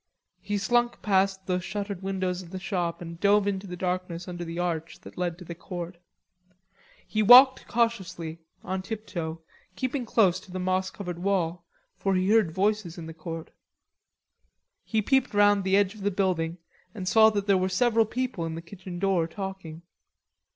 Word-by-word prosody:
He 205 +2 -2
slunk 240 +4 +1
past 190 -1 +2
the 180 -1 0
shuttered 200 +1 -4
windows 185 -1 -2
of 175 - -12
the 190 - -6
shop 175 -2 -2
and 170 0 -8
dove 205 +1 +4
into 195 0 -2
the 180 -1 -6
darkness 180 -1 -3
under 175 -1 -5
the 165 0 -6
arch 165 -2 -3
that - - -12
led 175 -2 -2
to 180 - -11
the 170 - -6
court. 175 0 -7 1.1
He 215 - 0
walked 255 +5 +8
cautiously, 190 -9 -1 0.2
on 190 0 -3
tiptoe, 180 -7 -5 0.3
keeping 255 +3 -2
close 190 -6 +3
to - - -18
the 185 - -4
moss 185 +1 0
covered 180 -4 -6
wall, 175 -3 -1 0.3
for 195 -1 +1
he 185 +2 +2
heard 220 -6 +4
voices 195 0 -1
in 165 - -7
the 160 - -8
court. 165 0 -7 1.3
He 220 -2 0
peeped 265 -1 +2
round 205 -1 +5
the 190 +1 +3
edge 200 -1 +2
of 215 - -12
the 200 - +1
building 180 -4 0 0.4
and 185 -3 -5
saw 220 +4 +7
that 205 -2 -2
there 200 -1 +4
were 185 +1 0
several 225 +3 +3
people 250 -5 -3
in 160 - -4
the 165 - -6
kitchen 180 0 -9
door 185 -3 +1
talking. 175 -3 -7
190 Hz, 180 wpm, -27 LUFS, 175-205 Hz, 1.3 s, walked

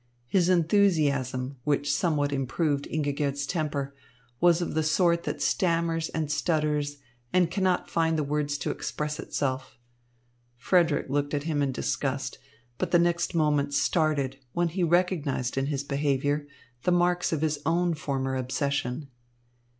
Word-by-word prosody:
His 175 +7 +2
enthusiasm, 150 -8 +2
which 145 -1 +1
somewhat 150 -6 +1
improved 140 +2 -1
Ingigerd's 145 -2 -1
temper, 145 -4 -2 0.5
was 175 -1 +5
of 175 - -2
the 160 - +1
sort 170 +2 +2
that - - -2
stammers 165 -2 +1
and 155 -2 -2
stutters 150 -1 0 0.3
and 180 -2 +3
cannot 185 -1 +1
find 165 -1 +1
the 155 - +1
words 145 0 -1
to - - -2
express 150 +1 -4
itself. 130 -5 -3 0.8
Frederick 165 +4 +2
looked 145 +1 0
at 145 - -2
him 155 -2 0
in 140 -1 +1
disgust, - - -2 0.4
but 185 - -1
the 175 - +5
next 170 0 +1
moment 145 -3 +2
started 140 -2 +1
when 175 0 +1
he 180 +3 -3
recognised 165 -7 +1
in 135 0 0
his 140 -2 -2
behaviour 145 +1 0 0.3
the 180 - +1
marks 175 0 +2
of 160 -3 -1
his 155 -2 0
own 170 +2 +1
former 135 -3 -2
obsession. 135 +1 -2
150 Hz, 140 wpm, -27 LUFS, 140-170 Hz, 0.8 s, was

